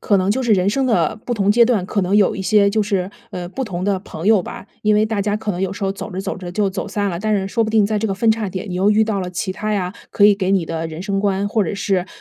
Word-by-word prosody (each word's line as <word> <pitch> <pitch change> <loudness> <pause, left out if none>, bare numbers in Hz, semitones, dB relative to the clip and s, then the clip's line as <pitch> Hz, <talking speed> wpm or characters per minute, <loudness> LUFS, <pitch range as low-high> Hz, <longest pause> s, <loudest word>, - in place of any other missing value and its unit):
可 205 - +2
能 190 +1 +1
就 260 +5 0
是 235 -3 +2
人 190 -1 +3
生 270 +3 0
的 220 -2 +1
不 240 - -1
同 200 -2 +2
阶 235 +3 +6
段， 225 -6 +1
可 200 - -1
能 190 +2 +1
有 205 -2 +3
一 - - -5
些 200 +1 +3
就 215 0 +1
是， 195 -2 -1 0.2
呃， 175 -1 -5
不 265 +7 -4
同 185 -4 -4
的 200 -2 +1
朋 165 -2 -7
友 215 -3 +5
吧， - - -9 0.2
因 210 0 +3
为 210 - +4
大 215 -2 -1
家 205 +1 0
可 215 -1 -3
能 180 - -5
有 190 0 -1
时 200 - -4
候 195 - 0
走 200 - -7
着 190 +1 -4
走 195 -1 -4
着 180 -1 -7
就 195 +1 0
走 190 - -4
散 205 -1 -1
了， 170 - -4
但 215 +1 0
是 195 -1 0
说 230 +2 +1
不 215 - -1
定 215 -2 +4
在 215 0 0
这 220 - -1
个 195 - -1
分 220 +3 +2
岔 220 -2 0
点 185 +1 -6
你 - - -4
又 195 +3 +2
遇 215 +1 +4
到 210 -3 -1
了 180 - -4
其 185 +2 -3
他 215 +3 -3
呀， 185 -3 -1 0.2
可 205 - +3
以 205 -1 +7
给 190 -1 -1
你 190 -4 +2
的 165 0 -3
人 160 +2 -7
生 195 0 -1
观， 200 0 0
或 215 0 +1
者 200 - -3
是 190 -2 0
200 Hz, 355 characters per minute, -19 LUFS, 185-215 Hz, 0.2 s, 以